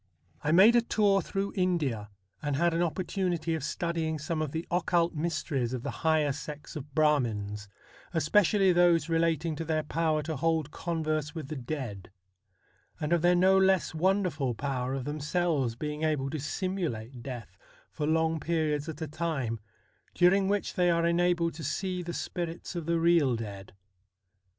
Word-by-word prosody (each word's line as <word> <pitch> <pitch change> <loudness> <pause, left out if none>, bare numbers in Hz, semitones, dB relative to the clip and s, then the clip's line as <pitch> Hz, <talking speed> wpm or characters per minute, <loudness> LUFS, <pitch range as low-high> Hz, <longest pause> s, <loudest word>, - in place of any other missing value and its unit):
I 150 - +1
made 200 +8 +7
a 240 - +6
tour 205 -4 +2
through 195 +3 -3
India, 150 - 0 0.3
and 145 -1 -1
had 170 +4 +2
an 165 - +1
opportunity 175 -1 -1
of 160 -4 -3
studying 160 0 -2
some 155 +2 -3
of 155 -3 -2
the 160 +2 -3
occult 175 -1 +2
mysteries 155 -6 -2
of 125 -2 -4
the 140 - -3
higher 155 -2 +3
sects 145 +1 -7
of 145 -1 -8
Brahmins, 110 -10 +1 0.4
especially 185 +4 +3
those 170 -2 +4
relating 165 -1 +1
to 165 - -3
their 155 -1 0
power 155 0 0
to 160 0 -3
hold 160 0 0
converse 155 -3 -2
with 155 -4 -6
the 155 - -4
dead; 120 -8 -5 0.9
and 150 +2 0
of 170 - +3
their 175 +1 +4
no 185 +2 +5
less 190 -3 +3
wonderful 160 - +1
power 130 0 -2
of 130 -2 -4
themselves 150 -4 0
being 150 +4 -4
able 150 -4 0
to 155 - -3
simulate 140 - -3
death 125 -2 -7 0.4
for 150 -2 -3
long 160 0 +2
periods 155 -1 -1
at 160 0 -5
a - - -3
time, 150 -8 -2 0.6
during 190 +2 +4
which 205 0 0
they 180 -1 +2
are 170 0 +2
enabled 170 0 +2
to 160 - -8
see 185 +1 -2
the 175 0 -5
spirits 170 +1 -5
of 170 -2 -4
the 170 0 +2
real 165 -7 +4
dead. 100 -4 -7
160 Hz, 165 wpm, -29 LUFS, 145-175 Hz, 0.9 s, made